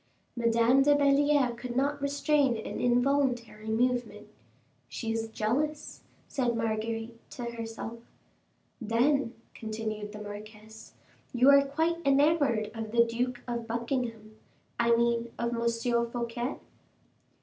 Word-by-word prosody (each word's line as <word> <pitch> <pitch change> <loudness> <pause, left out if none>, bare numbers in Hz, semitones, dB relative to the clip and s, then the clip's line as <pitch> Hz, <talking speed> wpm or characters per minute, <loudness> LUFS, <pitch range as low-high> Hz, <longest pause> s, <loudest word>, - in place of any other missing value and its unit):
Madame 235 +2 +3
de 290 +1 +5
Belliere 285 -3 +3
could 240 0 -6
not 285 +2 0
restrain 285 -2 +2
an 220 - -5
involuntary 245 -3 +1
movement. 245 +2 -1 0.6
"She 225 -2 -4
is 225 0 -2
jealous," 285 +8 -2 0.3
said 245 -4 0
Marguerite 225 +1 -3
to 245 - -7
herself. 230 0 -6 0.8
"Then," 240 +3 +1 0.2
continued 215 -1 -5
the 210 - -9
marquise, 215 +1 -10 0.4
"you 255 +3 +6
are 280 0 +7
quite 320 +5 0
enamored 275 -6 +3
of 225 -2 -5
the 235 0 +5
Duke 245 +2 -2
of 235 -1 -3
Buckingham 230 -2 -3 0.4
I 235 0 +4
mean 235 0 +1
of 235 0 -1
M. 235 0 +1 0.4
Fouquet?" 240 +2 -3
235 Hz, 115 wpm, -29 LUFS, 225-270 Hz, 0.8 s, are